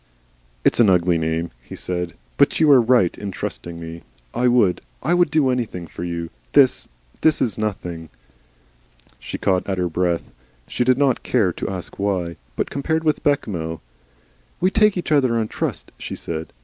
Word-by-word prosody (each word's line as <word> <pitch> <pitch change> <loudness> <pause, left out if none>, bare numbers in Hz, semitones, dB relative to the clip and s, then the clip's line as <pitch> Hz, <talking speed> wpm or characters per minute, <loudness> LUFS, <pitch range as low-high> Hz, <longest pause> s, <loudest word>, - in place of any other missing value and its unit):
"It's - - +3
an 115 -4 +6
ugly 90 -2 +3
name," 80 0 -1
he - - -10
said. 90 -2 -3 0.2
"But - - +3
you 155 -2 +6
are 130 -3 +8
right 115 -7 +3
in 100 - -5
trusting 85 -2 -5
me. 85 0 -8 0.3
I 125 - +2
would 115 -7 +3 0.2
I 165 +7 +2
would 175 0 +4
do 145 -4 +3
anything 115 -9 -3
for 85 - -8
you.... 85 -1 -4 0.2
This - - +4 0.4
is 135 -9 +3
nothing." 90 -7 -4 1.1
She - - -6
caught 95 0 0
at 95 - -1
her 90 -1 0
breath. 85 0 -1 0.4
She - - 0
did 130 0 +3
not 140 -2 +2
care 100 -8 +1
to - - -4
ask 95 -1 -6
why. 90 -4 -1 0.2
But - - -2
compared 160 +3 -1
with 155 -1 +1
Bechamel! 85 - -1 0.8
"We 185 +2 +2
take 210 -2 +4
each 175 - -3
other 130 -6 +3
on 110 -1 0
trust," - - -3
she - - -5
said. 80 -1 -5
100 Hz, 175 wpm, -22 LUFS, 85-130 Hz, 1.1 s, are